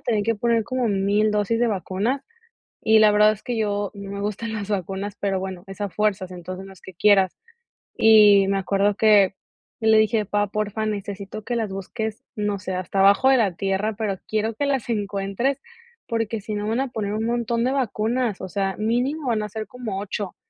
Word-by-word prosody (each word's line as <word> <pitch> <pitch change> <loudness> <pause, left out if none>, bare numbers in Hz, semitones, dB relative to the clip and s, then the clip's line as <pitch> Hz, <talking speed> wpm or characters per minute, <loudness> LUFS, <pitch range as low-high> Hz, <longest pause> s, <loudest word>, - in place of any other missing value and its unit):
tener 215 -4 0
que 230 0 +1
poner 230 +1 +1
como 255 0 -1
1000 205 +2 +2
dosis 210 +2 +1
de 240 - +3
vacunas". 205 - -1 0.6
Y 220 0 +5
la 215 -1 +6
verdad 210 +1 +5
es 215 - -14
que 245 -2 -3
yo 205 -2 -1
no 200 0 -8
me 200 - -5
gustan 210 +2 -3
las 205 -1 -5
vacunas. 195 +1 -3
Pero 195 -1 0
bueno, 185 -2 -6
es 195 +2 -9
a 205 - -1
fuerzas, 200 -2 -1
entonces, 185 +2 -7
no 195 - -11
es 190 - -20
que 190 - -11
quieras. 195 0 +4 0.6
Y 210 -3 +7
me 195 - +1
acuerdo 200 +2 +1
que 205 -3 +5 0.5
yo 220 - +1
le 220 0 +6
dije: 215 -1 +2
"Pá, 205 +1 +1
porfa, 215 +1 -2
necesito 200 0 -5
que 240 +1 -2
las 220 -3 -1
busques. 220 +3 -5
No 205 -1 -1
sé, 185 0 -4
hasta 185 +1 -2
abajo 200 +7 +5
de 265 - +6
la 200 -7 +1
tierra, 195 +2 -1
pero 205 -3 -1
quiero 220 +1 -1
que 285 +4 -1
las 270 -4 -1
encuentres, 205 +5 -1 0.5
porque 225 -1 -2
si 215 0 -5
no, 205 - -3
me 215 - -1
van 230 +4 0
a 270 - -1
poner 215 -4 -3
un 220 +1 -2
montón 235 0 0
de 260 - +1
vacunas. 240 -3 -1
O 190 - -5
sea, 195 0 -2
mínimo 250 +6 -1
van 220 -2 +1
a 210 - -4
ser 215 +1 -5
como 220 -4 -5
8". 200 -1 -5
210 Hz, 215 wpm, -23 LUFS, 195-225 Hz, 0.6 s, Y